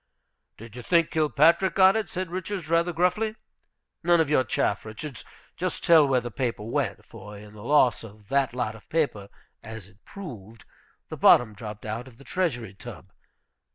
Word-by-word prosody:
"Did 115 0 -12
you 125 - -7
think 170 +5 +2
Kilpatrick 160 +4 +3
got 190 +1 +6
it?" 220 -4 -1
said 185 -1 -4
Richards, 185 -2 -5
rather 170 +1 +2
gruffly. 180 +6 0 0.7
"None 175 0 +3
of 155 -2 +1
your 130 - +4
chaff, 100 -3 -1
Richards. 120 +6 -8 0.3
Just 185 0 -3
tell 160 -5 +6
where 130 -2 +2
the 120 0 -7
paper 120 -3 -3
went, 120 +1 -2
for 105 -2 -11
in 105 0 -13
the 105 - -12
loss 130 -2 +3
of 105 -2 -14
that 135 -2 +1
lot 120 -3 -2
of 110 - -16
paper, 140 -11 -1 0.3
as 110 -2 -8
it 100 +1 -22
proved, 115 - -10 0.4
the - - -6
bottom 115 -3 +5
dropped 105 -1 -9
out 115 +4 -5
of 120 -3 -16
the 140 - -15
Treasury 120 - -2
tub. 95 - -11
130 Hz, 180 wpm, -26 LUFS, 110-170 Hz, 0.7 s, got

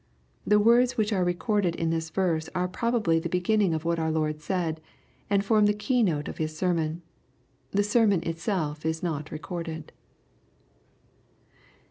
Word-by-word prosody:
The 210 0 +5
words 240 +3 +4
which 215 -1 +1
are 185 -2 +1
recorded 180 0 0
in 165 0 -1
this 165 0 -2
verse 160 -2 0
are 180 0 +1
probably 215 -4 +1
the 170 +1 -4
beginning 180 0 +2
of 160 +1 -4
what 170 0 0
our 160 0 0
Lord 155 -1 -1
said, 165 -2 -2 0.5
and 200 0 +2
form 215 0 +4
the 210 - +2
key 250 +4 +1
note 155 -8 0
of - - -7
His 155 0 -3
sermon. 170 -2 -1 0.7
The 205 +1 +1
sermon 205 -4 +3
itself 165 -2 -2
is 160 +1 -2
not 155 -3 -3
recorded. 160 0 -6
175 Hz, 155 wpm, -27 LUFS, 160-205 Hz, 0.7 s, The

